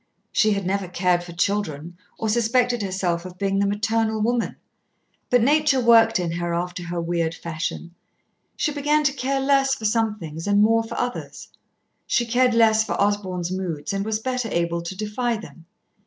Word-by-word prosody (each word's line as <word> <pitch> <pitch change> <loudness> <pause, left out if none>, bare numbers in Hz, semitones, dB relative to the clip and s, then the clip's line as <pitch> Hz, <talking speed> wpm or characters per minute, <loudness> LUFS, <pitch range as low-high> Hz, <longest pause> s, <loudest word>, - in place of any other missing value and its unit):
She 215 -1 +3
had 200 -2 -3
never 195 0 -1
cared 180 0 +1
for 175 - -10
children 175 -3 -2 0.2
or 220 - -2
suspected 240 +2 +2
herself 185 -3 -1
of 180 0 -10
being 195 0 0
the 200 - +2
maternal 220 +2 0
woman. 235 +2 0 0.7
But 245 -2 +4
Nature 295 0 +3
worked 225 -3 +5
in 175 -2 -2
her 170 0 -2
after 180 +1 -3
her 175 0 -3
weird 165 -1 -1
fashion. 170 +1 -5 0.6
She 305 - 0
began 295 +1 +1
to 280 -2 +2
care 270 0 -1
less 270 0 +3
for 220 - -7
some 220 0 +1
things 165 0 -7
and 205 0 +3
more 225 +1 +4
for 225 - -7
others. 245 0 -5 0.6
She 240 - +1
cared 250 +1 +2
less 220 -1 +5
for 220 - -4
Osborn's 190 -4 0
moods 185 -3 -3
and 195 0 -1
was 215 +1 -1
better 250 0 -2
able 170 0 0
to 170 +2 -7
defy 225 +3 -1
them. 170 -6 -13
210 Hz, 180 wpm, -23 LUFS, 175-235 Hz, 0.7 s, worked